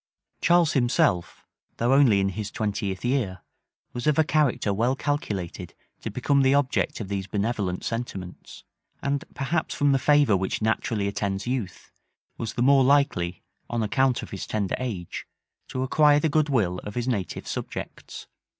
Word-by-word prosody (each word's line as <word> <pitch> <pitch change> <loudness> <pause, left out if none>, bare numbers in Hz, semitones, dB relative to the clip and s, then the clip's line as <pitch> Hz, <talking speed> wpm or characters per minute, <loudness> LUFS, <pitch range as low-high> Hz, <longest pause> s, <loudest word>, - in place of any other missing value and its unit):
Charles 170 -2 +4
himself, 120 - +1 0.3
though 120 +3 +2
only 130 -8 +5
in 95 0 +1
his 100 +2 -4
twentieth 100 -2 -3
year, 120 -8 0 0.5
was 120 +3 -4
of 150 - +3
a 160 - +6
character 145 -9 +1
well 120 +6 +1
calculated 110 - -3 0.3
to - - -4
become 140 -1 +1
the 135 +1 +4
object 145 +1 0
of 105 - -5
these 100 -1 -3
benevolent 100 -4 -2
sentiments; 100 -6 -6 0.4
and 140 0 0
perhaps 155 +4 -1
from 145 0 +3
the 135 - +3
favor 145 -6 +4
which 95 0 -1
naturally 110 -1 0
attends 100 0 -2
youth, 120 -7 -4 0.4
was 115 - -4
the 120 - +1
more 135 0 +6
likely, 125 -11 +2 0.3
on 120 -1 -1
account 130 +4 +1
of - - -9
his 95 - -5
tender 100 -4 -1
age, 105 -9 -5 0.4
to 130 - -3
acquire 145 +2 +4
the 160 - +1
good 150 0 +2
will 95 -9 +1
of 105 - -8
his 120 0 -2
native 105 -8 -2
subjects. - - -6
120 Hz, 160 wpm, -25 LUFS, 100-140 Hz, 0.5 s, a